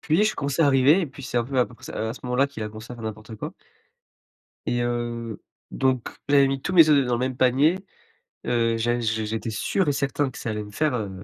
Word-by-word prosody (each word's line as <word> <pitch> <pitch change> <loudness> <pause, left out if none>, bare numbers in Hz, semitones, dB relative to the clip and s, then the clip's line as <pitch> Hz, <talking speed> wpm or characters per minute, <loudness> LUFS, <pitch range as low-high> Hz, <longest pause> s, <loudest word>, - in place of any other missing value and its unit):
Puis 165 +7 +2
je 215 - +1
commence 140 +1 -3
à 160 - +6
arriver 140 +5 +5
et 170 - -1
puis, 140 +1 -12
c'est 125 -1 -4
un 120 - +2
peu 130 +2 -2
à 125 - +4
peu 125 - -15
près - - -16
c - - -7
heu, 110 - -2
à 115 - -4
ce - - -12
moment-là 125 +3 +2
qu'il 140 -6 -7
a 105 - -3
commencé 110 +3 -10
à - - -8
faire 115 - -9
n'importe 110 0 -7
quoi - - -6 1.1
et 120 - 0
heu, 120 -2 -3 0.3
donc 130 -2 0 0.2
j'avais 140 -1 +6
mis 135 0 -2
tous 185 - -3
mes 165 -4 +7
œufs 140 -4 +4
dans 125 - +1
le - - -1
même 130 0 -2
panier. 135 +8 +3 0.7
Heu, 115 -1 +1
j'a 120 +2 0
j'é 110 -1 -1
j'étais 110 +1 -3
sûr 155 - 0
et - - +4
certain 140 0 0
que - - -11
ça 115 - -4
allait 105 0 -3
me 105 - -11
faire, 150 +6 0
heu, 100 -4 -5
125 Hz, 265 wpm, -24 LUFS, 115-140 Hz, 1.1 s, mes